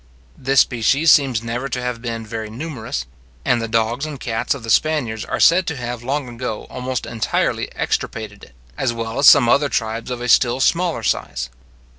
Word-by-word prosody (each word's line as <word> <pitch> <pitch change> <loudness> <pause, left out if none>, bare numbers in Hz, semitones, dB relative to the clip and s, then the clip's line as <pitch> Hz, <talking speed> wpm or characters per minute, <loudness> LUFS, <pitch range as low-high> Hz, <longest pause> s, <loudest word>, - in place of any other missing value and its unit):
This 135 0 +3
species 135 +7 +3
seems 130 -6 +3
never 120 +4 -3
to 125 - -2
have 125 -2 -4
been 115 -2 -4
very 110 0 -5
numerous; 115 - -5 0.4
and 120 -1 +2
the 115 - -2
dogs 115 +3 0
and 150 -3 -5
cats 115 +3 -1
of 130 - -9
the 115 - -2
Spaniards 125 -7 +1
are - - -3
said 180 +2 +5
to 155 - -2
have 120 -1 -5
long 135 +2 -2
ago 120 -2 -5
almost 130 -1 -3
entirely 115 -2 -1
extirpated 105 -2 -3
it, 60 - -22 0.2
as 130 -3 0
well 115 +1 -4
as 140 - +5
some 140 -5 +8
other 140 +4 +3
tribes 115 0 -2
of 125 -1 -4
a 120 - -4
still 120 +1 +4
smaller 170 -2 +1
size. - - -2
120 Hz, 190 wpm, -20 LUFS, 115-135 Hz, 0.4 s, some